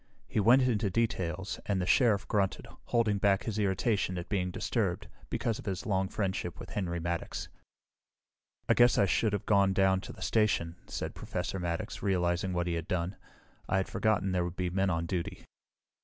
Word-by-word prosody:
He - - -1
went 120 +6 +6
into 110 -5 +1
details, 95 -3 -1
and 100 -2 +1
the 90 - 0
Sheriff 105 -1 +3
grunted, 100 -2 0 0.2
holding 110 -4 +1
back 95 -1 +3
his 110 -2 -3
irritation 100 -1 +1
at 85 - -6
being 95 -3 0
disturbed, - - -1 0.2
because 115 -2 -1
of - - -10
his 95 +3 -3
long 95 -3 +1
friendship 95 -1 -3
with - - -9
Henry 85 -4 -2
Maddox. 85 0 -3 1.2
"I - - +5
guess 120 0 +5
I - - +5
should 105 +3 +2
have 105 -2 -2
gone 100 -2 +4
down 95 -1 +3
to - - -8
the - - -8
station," 90 -6 +1
said - - -4
Professor 95 - -4
Maddox, 85 -1 -3
realizing 90 -1 +1
what 85 -1 0
he 85 - -1
had 85 -1 -3
done. 90 +2 -1 0.5
"I - - +2
had 95 - 0
forgotten 110 -3 +1
there 90 -1 +1
would 90 0 -4
be 90 -1 -2
men 95 +1 +1
on 85 -1 0
duty." 85 0 -4
95 Hz, 185 wpm, -31 LUFS, 90-105 Hz, 1.2 s, went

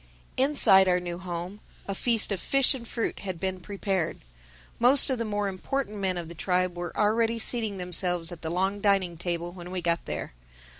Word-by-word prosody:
Inside 255 -9 +5
our 180 0 +3
new 175 -1 -5
home 180 +2 -6 0.3
a 195 - -2
feast 225 +1 +1
of 195 - -1
fish 275 +6 +3
and 240 -3 -8
fruit 230 - -3
had 185 -4 -5
been 190 0 -2
prepared. 195 -2 -2 0.6
Most 265 +3 +6
of 255 - -1
the 230 - -1
more 205 -1 -1
important 210 +4 -3
men 190 -2 -1
of 170 -2 -5
the 170 - -8
tribe 180 +1 0
were 175 -1 -4
already 225 +2 +2
seating 220 -3 0
themselves 180 -1 -1
at 175 - -9
the 160 - -4
long 190 +4 0
dining 195 -4 +2
table 175 0 -3
when 175 -1 -10
we 185 0 -3
got 170 -1 -1
there. - - -5
190 Hz, 195 wpm, -27 LUFS, 175-215 Hz, 0.6 s, Most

